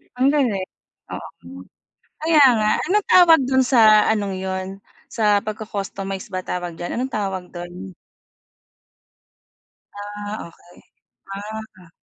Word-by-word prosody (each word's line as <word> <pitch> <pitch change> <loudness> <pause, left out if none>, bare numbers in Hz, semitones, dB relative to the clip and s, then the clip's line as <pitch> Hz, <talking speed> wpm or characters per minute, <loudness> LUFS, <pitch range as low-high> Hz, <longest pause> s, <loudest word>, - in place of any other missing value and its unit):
Ang 265 +3 +3
galing, 240 -10 +1 0.5
oo, - - -7 0.9
kaya 315 -2 +4 0.2
nga 215 0 +1 0.2
anong 420 0 +2
tawag 335 -4 +7
dun 260 0 +3
sa 220 -5 +5
anong 205 -3 -1
yun 190 0 -4 0.4
sa 210 -3 +2
pagco-customize 200 -3 -5
ba 185 - -2
tawag 175 -2 -4
diyan, 175 +7 -5
anong 260 +1 -3
tawag 190 -3 -3
dun? 175 - -8 2.0
Ah, 205 -1 -7
okey. 175 +1 -21 0.6
Ah. 210 -3 -9
205 Hz, 110 wpm, -21 LUFS, 190-235 Hz, 2.0 s, tawag